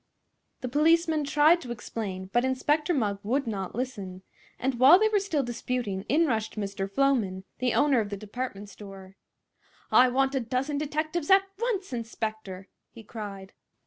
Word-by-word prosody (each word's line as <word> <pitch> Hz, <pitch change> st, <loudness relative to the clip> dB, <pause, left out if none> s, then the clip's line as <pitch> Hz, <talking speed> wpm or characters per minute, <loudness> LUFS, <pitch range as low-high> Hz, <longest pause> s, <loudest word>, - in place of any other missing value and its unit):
The 255 Hz, -, -3 dB
policemen 315 Hz, +3 st, +2 dB
tried 305 Hz, +4 st, +4 dB
to 250 Hz, -, -9 dB
explain, 195 Hz, -4 st, -6 dB
but 240 Hz, -, +3 dB
Inspector 295 Hz, +5 st, +1 dB
Mugg 210 Hz, -, 0 dB
would 265 Hz, +7 st, -1 dB
not 200 Hz, -5 st, -4 dB
listen; 200 Hz, -7 st, -5 dB, 0.3 s
and 255 Hz, -2 st, -2 dB
while 270 Hz, +7 st, +9 dB
they 435 Hz, +2 st, +3 dB
were 420 Hz, -1 st, +2 dB
still 335 Hz, -8 st, -1 dB
disputing 240 Hz, -5 st, -3 dB
in 320 Hz, +5 st, +4 dB
rushed 220 Hz, -6 st, -2 dB
Mr. 195 Hz, -1 st, -3 dB
Floman, 205 Hz, -6 st, +1 dB, 0.2 s
the 250 Hz, -1 st, 0 dB
owner 285 Hz, -4 st, +4 dB
of 210 Hz, -2 st, -2 dB
the 200 Hz, -, -4 dB
department 210 Hz, 0 st, -6 dB
store. 195 Hz, -1 st, -12 dB, 0.8 s
"I 255 Hz, 0 st, +6 dB
want 270 Hz, +2 st, +1 dB
a 270 Hz, -, +1 dB
dozen 260 Hz, +4 st, -2 dB
detectives, 310 Hz, +2 st, -2 dB
at 385 Hz, 0 st, +7 dB, 0.2 s
once, 415 Hz, -, -2 dB
inspector!" 220 Hz, -5 st, -5 dB, 0.2 s
he 230 Hz, -, -13 dB
cried. 200 Hz, -3 st, -8 dB
250 Hz, 160 wpm, -27 LUFS, 205-295 Hz, 0.8 s, while